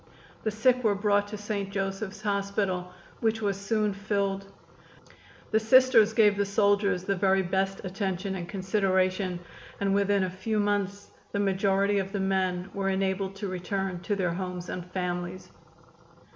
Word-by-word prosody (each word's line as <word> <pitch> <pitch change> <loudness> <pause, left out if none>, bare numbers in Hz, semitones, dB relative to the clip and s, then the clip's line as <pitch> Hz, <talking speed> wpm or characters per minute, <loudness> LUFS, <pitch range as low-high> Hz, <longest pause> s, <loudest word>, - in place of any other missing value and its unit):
The 220 - 0
sick 250 +4 +2
were 210 -3 +3
brought 205 0 +2
to 210 +1 -6
St. 205 -1 -3
Joseph's 195 +1 -4
Hospital, 200 -3 -1 0.3
which 225 -1 +1
was 200 -2 0
soon 210 +1 0
filled. 195 -1 -2 1.0
The 220 - +4
Sisters 230 -1 +6
gave 210 -3 +5
the 200 - +2
soldiers 200 -2 +2
the 195 +1 0
very 190 0 +3
best 195 +2 -1
attention 190 0 -2
and 180 -2 -5
consideration, 185 -2 0 0.4
and 195 -1 +1
within 200 0 +2
a 185 - -1
few 210 +4 -2
months 205 -1 -1 0.2
the 200 - 0
majority 200 0 +2
of 195 +1 -4
the 200 - -1
men 190 -1 0
were 195 -1 -1
enabled 190 0 -1
to 200 +1 -4
return 185 0 -3
to 175 +4 -2
their 180 -3 0
homes 180 -1 -5
and 180 0 -5
families. 180 0 -4
195 Hz, 155 wpm, -28 LUFS, 190-205 Hz, 1.0 s, Sisters